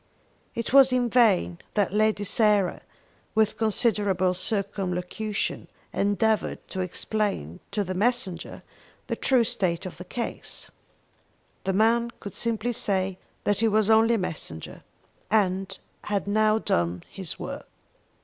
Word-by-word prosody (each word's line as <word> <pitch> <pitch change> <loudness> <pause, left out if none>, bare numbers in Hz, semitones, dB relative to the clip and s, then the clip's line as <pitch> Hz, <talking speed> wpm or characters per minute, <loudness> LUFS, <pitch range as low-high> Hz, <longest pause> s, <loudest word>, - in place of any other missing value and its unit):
It 230 +2 -3
was 270 -1 +8
in 245 -2 +1
vain 90 - +3 0.2
that 200 -3 +1
Lady 215 -1 +2
Sarah, 205 -3 +2 0.5
with 215 -1 +3
considerable 205 -4 +2
circumlocution, 195 +1 -2 0.3
endeavoured 205 +2 0
to 190 - -5
explain 185 - -2
to 205 - -1
the 185 -1 -4
messenger 195 -4 -1 0.4
the - - -2
true 255 -3 +3
state 185 -5 0
of 185 - -7
the 180 - -7
case. 235 +5 -5 0.9
The 190 - +1
man 230 +4 +3
could 200 - -8
simply 230 +1 -1
say 190 -3 +1 0.2
that 205 - +1
he 225 - +3
was 215 0 +3
only 225 +1 +5
a 190 -5 0
messenger, 80 - -7 0.5
and 195 -2 +1 0.3
had 205 -1 -1
now 215 +1 +3
done 85 - 0
his 190 -5 -6
work. - - -6
205 Hz, 130 wpm, -26 LUFS, 185-220 Hz, 0.9 s, was